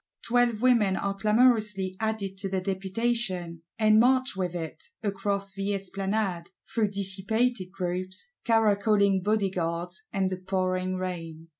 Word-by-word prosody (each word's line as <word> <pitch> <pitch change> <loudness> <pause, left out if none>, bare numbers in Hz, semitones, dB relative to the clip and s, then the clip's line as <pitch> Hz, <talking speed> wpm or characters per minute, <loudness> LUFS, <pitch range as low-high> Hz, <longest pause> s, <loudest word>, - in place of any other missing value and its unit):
Twelve 240 -1 +2
women 230 -7 +4
are 200 +1 -1
clamorously 210 -2 +2
added 220 -3 -2
to 195 -1 -2
the 190 0 0
Deputation; 190 -2 -2 0.2
and 215 -1 +5
march 255 0 +3
with 180 -2 -2
it, 160 -2 -6 0.2
across 200 -1 -1
the 200 +1 -1
Esplanade; 195 -2 -2 0.2
through 225 -2 +2
dissipated 200 +1 0
groups, 185 - -4
caracoling 205 -3 +3
Bodyguards, 180 -4 -1
and 190 -1 0
the 185 - -2
pouring 185 0 -1
rain. 165 -3 -5
195 Hz, 125 wpm, -27 LUFS, 185-215 Hz, 0.2 s, and